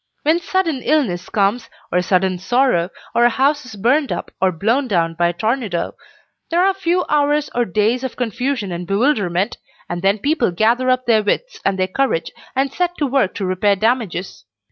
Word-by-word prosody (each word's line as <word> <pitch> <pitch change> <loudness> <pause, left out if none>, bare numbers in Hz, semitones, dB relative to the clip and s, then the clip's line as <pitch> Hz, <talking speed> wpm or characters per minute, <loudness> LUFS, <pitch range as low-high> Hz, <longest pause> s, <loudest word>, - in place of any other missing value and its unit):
When 315 +3 +3
sudden 340 -6 -1
illness 225 - 0
comes, 210 +3 0 0.2
or 180 - +2
sudden 185 0 +1
sorrow, 240 -4 +2 0.2
or 235 - +3
a 240 - +6
house 275 +3 +1
is 220 - -9
burned 260 +8 +1
up, - - -4
or 190 -1 +3
blown 225 - 0
down 170 -6 +1
by 170 +1 +1
a 170 - -1
tornado, 215 -3 -2 0.6
there 340 - +1
are 380 +2 +4
a - - -5
few 360 -1 0
hours 295 0 +1
or 240 0 +1
days 220 +6 0
of 260 - -4
confusion 245 -3 -2
and 175 0 -5
bewilderment, 200 -3 +1 0.3
and 175 0 -4
then 195 +2 +2
people 280 +1 +1
gather 230 +8 +2
up 255 0 +1
their 225 -2 +4
wits - - -2
and 195 -1 +1
their 185 0 +1
courage 220 -4 -1 0.2
and 270 +1 0
set 355 0 -1
to 295 - 0
work 260 -8 +1
to 195 - -3
repair 185 +2 +2
damages. 215 -4 -1
230 Hz, 190 wpm, -19 LUFS, 190-275 Hz, 0.6 s, a